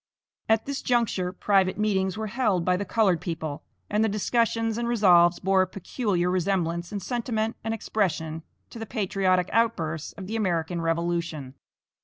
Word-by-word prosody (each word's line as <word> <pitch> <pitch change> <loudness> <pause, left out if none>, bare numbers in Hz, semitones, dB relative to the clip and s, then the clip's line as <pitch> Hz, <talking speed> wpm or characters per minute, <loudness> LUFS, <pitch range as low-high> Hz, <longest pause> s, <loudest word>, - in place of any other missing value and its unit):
At 220 0 +3
this 280 0 -3
juncture 225 -7 0
private 190 0 +1
meetings 190 -3 0
were 220 - -3
held 205 -6 0
by 180 - +3
the 200 +2 -2
colored 190 -5 +2
people, 160 -4 -4 0.3
and 210 +2 +1
the 220 - +2
discussions 225 +2 0
and 235 - -1
resolves 180 -7 +5
bore 190 0 +2
a 185 - +1
peculiar 185 -1 -1
resemblance 175 -2 -1
in 205 - -3
sentiment 225 +1 -2
and 225 - -2
expression 165 -8 -2 0.3
to 230 - -9
the 225 - -6
patriotic 190 -4 0
outbursts 170 -9 0
of 195 - -8
the 215 +4 -4
American 175 -5 -1
revolution. 165 -4 -2
190 Hz, 160 wpm, -26 LUFS, 175-220 Hz, 0.3 s, resolves